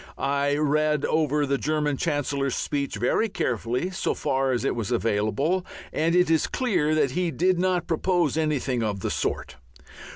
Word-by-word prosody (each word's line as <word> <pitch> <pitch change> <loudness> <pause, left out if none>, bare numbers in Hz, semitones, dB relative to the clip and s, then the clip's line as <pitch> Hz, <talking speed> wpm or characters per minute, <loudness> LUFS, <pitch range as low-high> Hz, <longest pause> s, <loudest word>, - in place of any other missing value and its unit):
I 140 +1 0
read 150 0 +1
over 150 -2 +1
the 140 0 0
German 150 -2 0
Chancellor's 140 -1 -1
speech 140 -5 -2
very 125 - +1
carefully, 125 - -2
so 190 - -1
far 135 -2 0
as 125 - -1
it - - 0
was 115 -4 -3
available, 115 - 0 0.3
and 165 +2 +1
it 180 0 +4
is 160 - +3
clear 185 - 0
that 145 -4 +2
he 180 +3 0
did 175 +5 +1
not 180 -2 +1
propose 170 -2 +1
anything 145 -6 0
of 105 -3 -2
the - - -2
sort. - - -3
150 Hz, 165 wpm, -25 LUFS, 130-165 Hz, 0.3 s, it